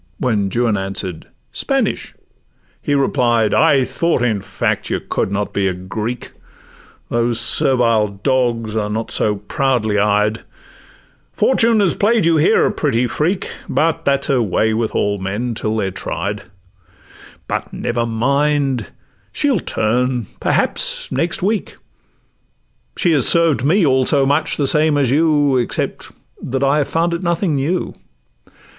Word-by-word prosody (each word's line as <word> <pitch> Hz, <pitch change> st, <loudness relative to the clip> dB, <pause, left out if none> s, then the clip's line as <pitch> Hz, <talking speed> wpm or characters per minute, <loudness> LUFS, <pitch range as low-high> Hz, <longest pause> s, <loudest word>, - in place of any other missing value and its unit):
When 105 Hz, -6 st, 0 dB
Juan 115 Hz, 0 st, 0 dB
answer'd—'Spanish!' 95 Hz, -3 st, -3 dB, 0.7 s
he 145 Hz, -, 0 dB
replied, 120 Hz, -5 st, +1 dB
'I 145 Hz, -4 st, +4 dB
thought, 165 Hz, -5 st, 0 dB
in 110 Hz, -5 st, 0 dB
fact, -, -, -2 dB
you -, -, -1 dB
could -, -, -3 dB
not 100 Hz, +1 st, -2 dB
be 100 Hz, -1 st, 0 dB
a 95 Hz, -, 0 dB
Greek; 110 Hz, +6 st, -5 dB, 0.8 s
Those 120 Hz, 0 st, +1 dB
servile 120 Hz, -3 st, +3 dB
dogs 115 Hz, +1 st, -1 dB
are 105 Hz, -1 st, -1 dB
not 110 Hz, +2 st, -3 dB
so 105 Hz, -1 st, +2 dB
proudly 110 Hz, 0 st, -1 dB
eyed: 105 Hz, +2 st, +1 dB, 0.9 s
Fortune 230 Hz, -2 st, +2 dB
has 190 Hz, -4 st, +2 dB
play'd 220 Hz, -2 st, +2 dB
you 165 Hz, -1 st, +3 dB
here 155 Hz, -, +3 dB
a -, -, +1 dB
pretty 125 Hz, -5 st, 0 dB
freak, 170 Hz, +9 st, -2 dB, 0.2 s
But 165 Hz, 0 st, 0 dB
that 140 Hz, 0 st, +2 dB
's -, -, -6 dB
her 135 Hz, -3 st, +2 dB
way 110 Hz, +1 st, +1 dB
with 110 Hz, 0 st, -2 dB
all 100 Hz, 0 st, 0 dB
men, 105 Hz, +6 st, -3 dB
till 110 Hz, 0 st, -3 dB
they're 95 Hz, -3 st, -1 dB
tried; 100 Hz, +1 st, -5 dB, 1.0 s
But -, -, -3 dB
never 120 Hz, 0 st, -2 dB
mind,—she'll 140 Hz, -, -1 dB
turn, 125 Hz, 0 st, -1 dB
perhaps, -, -, 0 dB
next 165 Hz, +6 st, -1 dB
week; 210 Hz, +1 st, -1 dB, 1.2 s
She 175 Hz, -, +2 dB
has 145 Hz, -5 st, +3 dB
served 165 Hz, -6 st, +3 dB
me 170 Hz, +6 st, +3 dB
also 135 Hz, +1 st, +3 dB
much 145 Hz, +3 st, 0 dB
the 145 Hz, -, 0 dB
same 150 Hz, +1 st, +2 dB
as 135 Hz, -4 st, +1 dB
you, 145 Hz, -2 st, +3 dB
Except 120 Hz, -, -3 dB, 0.3 s
that 135 Hz, +2 st, -3 dB
I 140 Hz, +2 st, +3 dB
have 145 Hz, -, 0 dB
found 170 Hz, +1 st, 0 dB
it 170 Hz, -, -3 dB
nothing 170 Hz, -1 st, 0 dB
new. 145 Hz, +6 st, -1 dB
125 Hz, 140 wpm, -18 LUFS, 110-150 Hz, 1.2 s, I